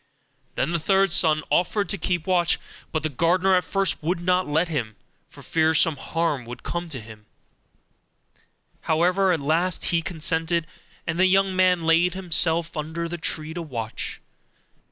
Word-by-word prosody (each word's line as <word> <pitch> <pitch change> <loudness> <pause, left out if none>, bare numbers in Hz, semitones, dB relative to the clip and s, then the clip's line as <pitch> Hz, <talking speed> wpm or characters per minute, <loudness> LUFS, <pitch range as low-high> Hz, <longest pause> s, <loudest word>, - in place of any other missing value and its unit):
Then 140 - -1
the 170 - 0
third 195 +3 +2
son 160 -3 +4
offered 190 +3 +1
to 200 - -1
keep 175 -1 -1
watch; 175 -4 +2 0.3
but 155 -2 -2
the - - +1
gardener 180 +7 +2
at 180 -1 +3
first 195 0 -1
would 170 +3 -1
not 180 +1 +1
let 160 +4 +1
him, 120 -10 -3 0.3
for - - -15
fear 160 0 +1
some 160 0 +3
harm 150 -4 -2
should 120 - -9
come 170 0 -4
to 135 -5 -4
him: 110 -1 -13 1.6
however, 180 +4 +2
at 170 - +1
last 165 +5 0
he 170 -1 +2
consented, 165 -1 -1 0.4
and 170 +1 -3
the 185 - +5
young 195 0 +2
man 185 -2 +3
laid 165 +2 +3
himself 170 -2 0
under 160 +2 -4
the 175 +1 -6
tree 155 0 -1
to 175 - -5
watch. 115 -8 -5
170 Hz, 165 wpm, -24 LUFS, 155-180 Hz, 1.6 s, the